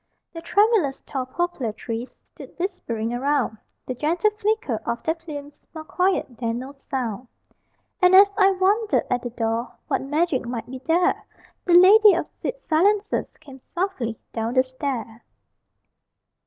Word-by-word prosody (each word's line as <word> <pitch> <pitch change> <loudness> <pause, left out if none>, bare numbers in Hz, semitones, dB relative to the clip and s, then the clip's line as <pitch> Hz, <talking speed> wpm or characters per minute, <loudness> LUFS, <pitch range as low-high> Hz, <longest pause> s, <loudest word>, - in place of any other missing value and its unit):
The 330 - -7
tremulous 390 - +2
tall 260 -3 -4
poplar 290 -5 -2
trees 230 +3 -6
Stood - - -13
whispering 240 - -3
around, 255 -3 0 0.3
The 255 - -3
gentle 335 - +1
flicker 425 - -1
of 235 - -3
their 320 - +1
plumes 295 -3 -9 0.2
More 315 - -6
quiet 360 -8 -1
than 230 -1 -1
no 260 +3 -7
sound. 255 -4 -5 0.7
And 360 0 +6
as 400 +1 +8
I 390 -2 +5
wondered 405 +4 +1
at 245 -1 +1
the 245 - -4
door 230 0 -2
What - - 0
magic 295 -2 0
might 235 -2 -4
be 260 +1 -8
there, 340 +7 +1 0.4
The 355 - +2
Lady 395 +3 +8
of - - -2
Sweet - - -5
Silences 400 +6 +1
Came 275 -4 -14
softly 340 - -2 0.2
down 230 +2 -2
the 255 - +5
stair. 255 -4 -5
290 Hz, 150 wpm, -23 LUFS, 245-370 Hz, 0.7 s, as